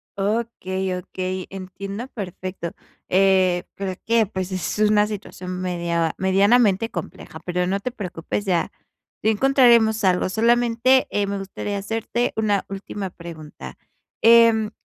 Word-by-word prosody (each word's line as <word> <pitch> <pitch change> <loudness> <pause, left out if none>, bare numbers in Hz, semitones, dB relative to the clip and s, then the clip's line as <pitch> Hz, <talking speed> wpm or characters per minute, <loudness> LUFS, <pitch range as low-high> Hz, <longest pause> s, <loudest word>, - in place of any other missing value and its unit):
Okey, 195 -3 -2
okey, 185 0 -4
entiendo, 195 +4 -6
perfecto. 185 -6 -6 0.4
Eh, 185 -2 +3
pero 195 -1 -3
que, 230 -1 +3
pues, 190 -2 -5
es 185 +2 -3
una 210 -1 +4
situación 185 -3 -6
media 170 -2 -1
medianamente 200 +3 +3
compleja, 170 -3 -7
pero 180 0 -1
no 195 +2 0
te 250 +5 -4
preocupes, 200 -2 -4
ya 180 -3 0 0.5
ya 220 - +4
encontraremos 235 -2 +4
algo, 185 -1 +2
solamente, 240 +4 +3
eh, 205 - 0
me 200 0 -3
gustaría 200 +1 -4
hacerte 225 +4 -2
una 210 -2 +1
última 195 0 -5
pregunta. 165 -3 -10 0.4
Em, 230 -2 +6
195 Hz, 125 wpm, -22 LUFS, 185-220 Hz, 0.5 s, Em